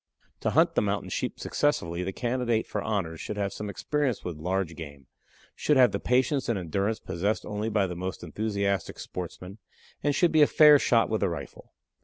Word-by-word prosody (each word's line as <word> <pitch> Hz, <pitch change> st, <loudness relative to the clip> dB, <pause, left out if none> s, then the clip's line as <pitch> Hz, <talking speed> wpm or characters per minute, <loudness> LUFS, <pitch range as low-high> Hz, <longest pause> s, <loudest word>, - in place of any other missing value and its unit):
"To -, -, 0 dB
hunt -, -, +3 dB
the -, -, +2 dB
Mountain -, -, -2 dB
Sheep -, -, -3 dB
successfully 90 Hz, -, 0 dB
the 95 Hz, -, -3 dB
candidate 120 Hz, 0 st, -1 dB
for -, -, -3 dB
honors 90 Hz, -7 st, -2 dB
should 105 Hz, -, -5 dB
have 100 Hz, -1 st, -1 dB
some 105 Hz, -1 st, -5 dB
experience 140 Hz, +2 st, -1 dB
with 90 Hz, -, -4 dB
large 90 Hz, +1 st, -2 dB
game, 70 Hz, -4 st, -9 dB, 0.5 s
should 150 Hz, -, +1 dB
have 125 Hz, -2 st, +6 dB
the -, -, -2 dB
patience 130 Hz, +2 st, +1 dB
and 115 Hz, -, +1 dB
endurance 95 Hz, +5 st, -1 dB
possessed 95 Hz, +4 st, -2 dB
only 105 Hz, +1 st, -3 dB
by 105 Hz, -3 st, +2 dB
the 90 Hz, -2 st, -5 dB
most 95 Hz, +2 st, -5 dB
enthusiastic 100 Hz, -2 st, -2 dB
sportsman, 90 Hz, +3 st, -7 dB, 0.4 s
and 145 Hz, 0 st, +1 dB
should 175 Hz, -, +3 dB
be 155 Hz, -, +4 dB
a 145 Hz, -, +7 dB
fair 150 Hz, -2 st, +7 dB
shot 115 Hz, -4 st, +3 dB
with 110 Hz, -, -1 dB
the 100 Hz, -, +2 dB
rifle. 80 Hz, -4 st, -8 dB
105 Hz, 195 wpm, -27 LUFS, 90-125 Hz, 0.5 s, a